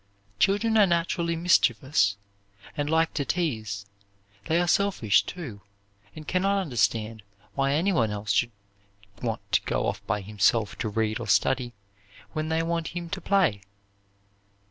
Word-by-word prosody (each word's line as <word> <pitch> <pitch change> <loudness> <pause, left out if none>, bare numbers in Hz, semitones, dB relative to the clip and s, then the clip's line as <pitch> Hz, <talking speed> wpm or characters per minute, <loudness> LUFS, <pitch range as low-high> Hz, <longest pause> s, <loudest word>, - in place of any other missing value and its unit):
Children 220 - +3
are 205 - +6
naturally 170 0 0
mischievous, 130 - +2 0.6
and 145 -1 -2
like 160 +1 +2
to 145 - -1
tease. 110 - -2 0.6
They 165 +2 +2
are 175 - +1
selfish, 180 - +3
too, 130 - -8 0.5
and 155 -1 -10
can 185 - +1
not 200 +1 +2
understand 115 - -1 0.3
why 135 +4 +1
anyone 160 - +2
else 105 0 -3
should 120 +3 +2 0.7
want 115 -3 -2
to - - +3
go - - -1
off - - -3
by 105 +1 0
himself 105 +1 +1
to 110 - -1
read 110 +1 -1
or - - -6
study 125 -2 +2 0.6
when 155 0 -2
they 160 0 +1
want 165 0 -2
him 170 -1 -6
to 190 - -4
play. 185 - +2
145 Hz, 145 wpm, -26 LUFS, 110-170 Hz, 0.7 s, are